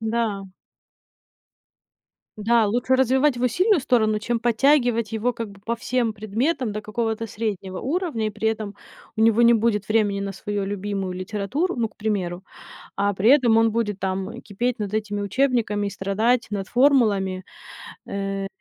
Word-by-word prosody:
Да. 220 -3 -1 1.9
Да, 225 +1 +3
лучше 245 +5 +1
развивать 265 +2 +3
его 245 +1 +1
сильную 365 - +3
сторону, 220 -4 +2
чем 230 +2 -2
подтягивать 240 -2 +2
его 230 +3 0
как 230 -3 -5
бы 200 0 -15
по 230 +3 -3
всем 240 -1 -1
предметам 225 +5 -1
до 210 - -4
какого-то 225 +1 -2
среднего 200 -4 -4
уровня, 300 - -1
и - - -1
при 215 +1 -1
этом 215 -2 -3 0.4
у - - -2
него 225 +1 +4
не 235 0 +7
будет 220 -3 +1
времени 210 -2 +1
на 200 0 -3
свою 205 +1 -3
любимую 195 -1 -3
литературу, 210 - -2
ну, 230 -2 0
к - - -30
примеру. 190 -5 -2 0.5
А 200 0 +1
при 200 +5 +3
этом 255 -5 +5
он 225 0 +4
будет 210 -3 -1
там, 190 0 -2
э, 235 +1 -8
кипеть 240 +4 -2
над 205 -2 -4
этими 205 -1 -2
учебниками 220 -3 0
и - - -3
страдать 210 +5 0
над 195 -2 -4
формулами, 215 -9 +2 0.6
э, 195 0 -3
220 Hz, 160 wpm, -23 LUFS, 200-240 Hz, 1.9 s, не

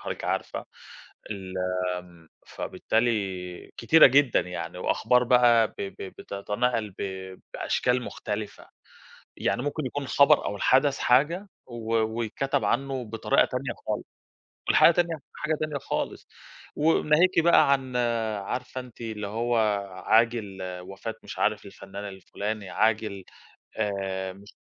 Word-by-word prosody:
حضرتِك - - -5
عارفة - - -2 0.7
ال 95 -3 -6 0.4
آمم، 85 -2 -15 0.2
فبالتالي 100 -6 -2
كتيرة 155 +7 +7
جدًا 135 -1 +4
يعني، 90 0 -6
وأخبار 125 +6 +2
بقى 120 -2 +5
ب - - -23
ب 95 -1 -4 0.2
بتتنقل 105 +3 -2
ب - - -3 0.5
بأشكال 125 0 0
مختلفة، 105 -2 -6 0.7
يعني 120 - 0
ممكن 145 +1 -2
يكون 145 +3 -4
الخبر 140 +2 +4
أو - - -2
الحدث 135 +5 +3
حاجة 150 +11 +3 0.2
و 115 -2 -5
ويتكتب 115 +5 0
عنه 135 0 -1
بطريقة 115 +5 +2
تانية 125 -1 -3
خالص، 105 - -1 0.7
والحاجة - - +7
تانية 170 -2 0 0.2
حاجة 155 0 -1
تانية 155 -2 -2
خالص، - - -4 0.5
وناهيكِ 160 +3 +4
بقى 165 -4 +5
عن 130 -2 0 0.4
عارفة 125 +6 -4
أنتِ 125 -2 -13
اللي 110 -3 -4
هو 115 +3 0 0.5
عاجل 110 -4 +2 0.3
وفاة 95 - -6
مش - - -8
عارف - - +1
الفنان 100 +1 -9
الفلاني، 100 +2 -5
عاجل 110 -3 0 0.5
آآ 95 -3 -2
مش 100 +2 -16
عارف - - -61
115 Hz, 125 wpm, -26 LUFS, 100-135 Hz, 0.7 s, كتيرة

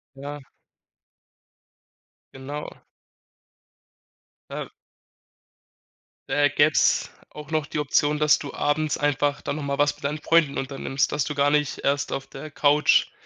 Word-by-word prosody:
Ja. 145 +2 -7 1.9
Genau. 140 +3 -6 1.8
Äh. - - -5 1.6
Da 145 0 +3
gäb's 145 +2 +3 0.2
auch 150 +1 -11
noch 155 -2 0
die - - -5
Option, 150 +1 +1
dass 150 0 +4
du 145 - -7
abends 150 +1 0
einfach 145 0 0
dann 145 - -3
noch 150 - -5
mal 140 0 -2
was 145 0 +2
mit - - -10
deinen 150 +2 -1
Freunden 155 -2 +2
unternimmst, 135 0 -1
dass 150 -3 0
du 150 - -4
gar 145 0 +3
nicht 150 -2 0
erst 140 +1 0
auf 135 - -3
der 150 +3 -9
Couch 150 0 +3
145 Hz, 130 wpm, -24 LUFS, 140-150 Hz, 1.9 s, dass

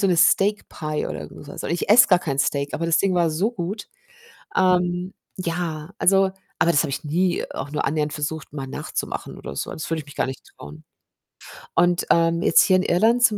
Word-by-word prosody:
so 200 - +3
'ne 180 -2 +2
Steak 200 +5 +3
Pie 155 -1 -3
oder 75 -1 -6
so - - -13
was - - -7
und - - -3
ich 170 +3 -2
esse 235 +3 +8
gar 180 -3 +5
kein 140 -5 -3
Steak, 140 0 0
aber 165 - -2
das 165 -1 +3
Ding 195 -2 +1
war 170 -2 +2
so 185 +9 0
gut. 200 -1 -5 0.7
Ähm, 180 0 +1 0.2
ja, 170 -2 -3
also 195 0 +4 0.3
aber 170 - +3
das 145 - +3
habe 145 - -3
ich 140 - -4
nie 175 +4 0
auch 140 +1 -6
nur 150 - -2
annähernd 150 +1 0
versucht, 150 0 -4
mal 135 -3 -6
nachzumachen - - -5
oder 70 - -8
so. - - -3
Das 160 - -6
würde 165 - 0
ich 150 - -11
mich 145 - -13
gar - - 0
nicht 130 0 -7
trauen 75 +2 -12 0.9
und, 175 +1 +2
ähm, 170 0 +3
jetzt - - +5
hier 190 - +4
in - - +2
Irland 225 +8 +3
zum 215 -3 +4
170 Hz, 220 wpm, -23 LUFS, 150-185 Hz, 0.9 s, esse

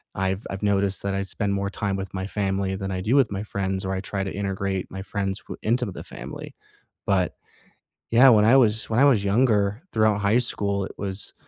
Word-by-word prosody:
I've 95 +1 -1
I've 95 +1 -5
noticed 100 -2 +1
that 100 - -1
I 100 0 -1
spend 100 +1 -2
more 100 0 -1
time 100 0 -2
with 95 -1 -5
my 95 0 -3
family 95 -2 -1
than 95 0 -4
I 95 -1 -2
do 110 +8 +1
with 130 -7 +4
my 100 +1 -3
friends, 95 -2 -3
or 95 - -1
I 95 - -2
try 95 0 -3
to 95 - -4
integrate 95 -1 -3
my 95 - -6
friends 100 0 -3
w - - -7
into 120 +3 +1
the 95 -5 -7
family. - - -9 0.5
But, 95 -2 +1 0.8
yeah, 125 +3 +7
when 105 -3 +6
I 120 +5 +6
was 110 -4 +2
when 110 +2 +1
I 140 - +6
was 120 -8 +4
younger, 105 0 +2
throughout 110 -2 +2
high 100 +4 +3
school, 100 -4 -1
it - - -9
was, 100 0 -5
100 Hz, 220 wpm, -24 LUFS, 95-105 Hz, 0.8 s, yeah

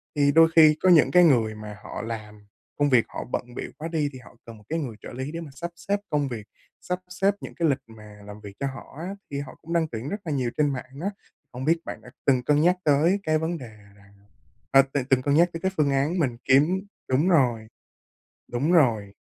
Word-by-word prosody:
Thì 145 -1 +3
đôi 165 +1 +7
khi 155 -2 +8
có 185 - +4
những 170 -4 +6
cái 180 0 +6
người 115 -8 +3
mà 105 -1 -9
họ - - -6
làm, 105 -2 -7 0.3
công 145 0 +2
việc 125 -4 +4
họ - - -6
bận 120 0 -4
bịu - - -5
quá 160 - -5
đi 155 -3 -1
thì 130 - -9
họ 125 - -16
cần 115 -2 -11
một 105 - -18
cái 165 - -1
người 125 -8 -5
trợ - - -9
lý 130 +4 -5
để 165 - -5
mà 155 -4 -9
sắp 170 +6 -5
xếp 200 +4 -2
công 145 -2 0
việc, 110 -5 -7 0.3
sắp 180 0 -3
xếp 195 +2 +1
những - - -8
cái 165 -3 +1
lịch 135 - +2
mà 105 -2 -14
làm 105 +1 -10
việc 100 -1 -10
cho 140 - -1
họ 135 0 -9
á 185 +4 -5 0.2
thì 140 - -3
họ 140 -2 -8
cũng 170 +2 -6
đăng 165 -2 +2
tuyển 120 +1 -6
rất 205 - -3
là 160 - -3
nhiều 130 -4 -1
trên 145 -2 +2
mạng 130 +2 -8
á. 195 - -1 0.4
Không 125 +2 -6
biết 165 +2 +3
bạn - - -7
đã - - -13 0.2
từng 130 -3 +3
cân 150 +2 +3
nhắc 180 +2 +3
tới 160 +7 +3
cái 155 0 +2
vấn 165 +2 -2
đề 115 -6 -11 0.2
rằng 100 0 -21 0.6
ờ, 135 0 +7
từng 140 -3 0
từng 130 0 +2
cân 145 +1 +1
nhắc 170 +3 +5
tới 165 - -6
cái 190 - 0
phương 150 -2 +2
án 140 +6 +1
mình 125 -7 0
kiếm 150 +8 +4 0.3
đúng 140 +7 +2
rồi. 125 -10 +2 0.9
Đúng 140 +8 0
rồi. 115 - +3
140 Hz, 250 wpm, -25 LUFS, 120-165 Hz, 0.9 s, khi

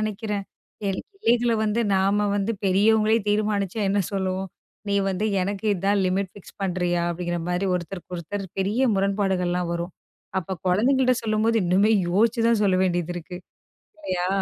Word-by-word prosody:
நினைக்கிறேன். 210 -1 -3 0.5
எல்லைகளை 240 - 0
வந்து 215 +2 +1 0.2
நாம 200 +2 +2
வந்து 205 +3 0
பெரியவங்களே 215 +3 +4
தீர்மானிச்சா 210 -1 0
என்ன 200 +1 +2
சொல்லுவோம், 190 0 -2 0.4
"நீ 200 - +1
வந்து 195 +3 -1 0.2
எனக்கு 200 +3 -3
இதான் 195 +2 +1
லிமிட் 190 0 0
ஃபிக்ஸ் 205 - -15
பண்றியா?" 175 -2 0
அப்படிங்கற 175 0 -3
மாதிரி 180 +2 0
ஒருத்தருக்கு 180 +1 -5
ஒருத்தர் 195 +4 -5
பெரிய 230 +7 +1
முரண்பாடுகள்லாம் 190 -3 0
வரும். 170 +1 -4 0.5
அப்ப 185 0 -6
குழந்தைகள்ட்ட 255 +6 +3
சொல்லும்போது 220 +1 +2
இன்னுமே 195 +5 +3 0.2
யோசிச்சு 225 +5 +2
தான் 225 -3 +3
சொல்ல 190 -2 +3
வேண்டியதிருக்கு 175 0 -3 0.6
இல்லையா? 185 -11 -2
195 Hz, 135 wpm, -24 LUFS, 180-215 Hz, 0.6 s, பெரியவங்களே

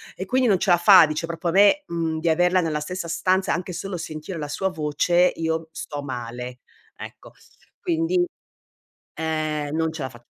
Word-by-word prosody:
e 190 - -5
quindi 255 0 +2
non 195 -5 +3
ce 200 - -1
la 175 - +6
fa, 175 -2 +8
dice 155 +2 -3
proprio 170 +1 -3
a - - -2
me, 205 +9 +5
uhm, 165 -2 -2
di 165 +1 0
averla 180 +3 +3
nella 155 -3 -1
stessa 180 +3 -5
stanza, 185 +3 +1
anche 180 0 -5
solo 185 +2 -5
sentire 155 +2 -6
la 150 -2 -4
sua 190 +6 -1
voce, 175 +2 +2
io 160 0 -3
sto 145 -3 -6
male, 125 -1 -6 0.4
ecco. - - -11 0.5
Quindi, 350 +1 +1 0.9
ehm, 155 -2 -2
non 160 0 0
ce 160 -3 -6
la 130 - -4
fa 120 -1 -16
165 Hz, 185 wpm, -23 LUFS, 155-185 Hz, 0.9 s, fa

